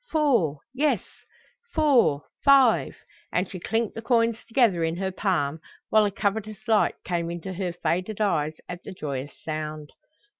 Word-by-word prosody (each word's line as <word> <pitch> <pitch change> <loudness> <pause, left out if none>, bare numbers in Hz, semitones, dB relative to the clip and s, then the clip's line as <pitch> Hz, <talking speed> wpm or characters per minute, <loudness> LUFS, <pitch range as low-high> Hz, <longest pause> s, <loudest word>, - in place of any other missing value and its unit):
"Four, 235 - +2
yes, 295 +3 +1 0.7
four, 265 - +4 0.2
five;" 270 -4 +5 0.4
and 180 +1 0
she 185 - -8
clinked 225 +4 -1
the 225 - -6
coins 230 -1 +1
together 225 -8 +3
in 165 0 0
her 190 0 -2
palm, 175 -6 0 0.3
while 215 -1 +5
a 205 - 0
covetous 210 +2 -3
light 220 -2 +3
came 170 -1 -1
into 175 +2 -5
her 185 -1 -2
faded 180 +4 -2
eyes 155 -7 +1
at 180 0 -7
the 200 - -8
joyous 140 -5 -5
sound. 155 -1 -5
190 Hz, 150 wpm, -26 LUFS, 165-225 Hz, 0.7 s, five